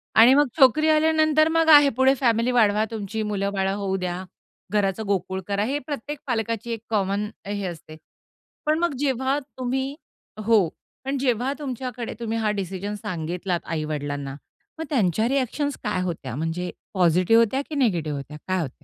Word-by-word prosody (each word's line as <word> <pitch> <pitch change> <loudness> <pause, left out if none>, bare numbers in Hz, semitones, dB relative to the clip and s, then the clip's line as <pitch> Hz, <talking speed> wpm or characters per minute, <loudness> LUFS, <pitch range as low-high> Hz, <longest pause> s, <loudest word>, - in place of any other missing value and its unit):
आणि 230 +4 +8
मग 290 0 +4
छोकरी 305 +4 +5
आल्यानंतर 310 0 +4
मग 325 0 +2
आहे 290 -2 +9
पुढे 265 +1 +5
फॅमिली 235 -1 +2
वाढवा, 215 -3 +3
तुमची 220 0 -4
मुलं 200 -1 -1
बाळ 190 -1 0
होऊ 195 -1 -1
द्या, 180 0 -3 0.5
घराचं 205 +1 0
गोकुळ 190 -1 -1
करा. 200 0 0
हे 280 +4 -1
प्रत्येक 290 +1 -6
पालकाची 230 -1 -2
एक 225 - -3
कॉमन 205 -1 0 0.2
हे 200 -1 -3
असते. 155 -2 -9 0.7
पण 310 +1 +2
मग 345 -4 +1
जेव्हा 265 0 +1 0.2
तुम्ही 265 +2 -2 0.5
हो, 215 -6 +4 0.4
पण 275 +1 -1
जेव्हा 255 0 0
तुमच्याकडे 250 -3 -5
तुम्ही 230 -1 -2
हा 215 -2 +1
डिसिजन 200 +1 -4
सांगितलात 175 -1 -3
आई 160 -1 -2
वडिलांना. 145 -2 -4 0.4
मग - - -2
त्यांच्या 220 - +2
रिअ‍ॅक्शन्स 275 +2 -1
काय 185 - -1
होत्या, 155 -9 -4
म्हणजे 165 +4 -3 0.2
पॉझिटिव्ह 185 +5 +4
होत्या 265 +5 -1
की 310 - -5
निगेटिव्ह 170 - 0
होत्या 145 +2 -8
काय 185 0 0
होत्या? 150 - -3
220 Hz, 160 wpm, -24 LUFS, 185-265 Hz, 0.7 s, आहे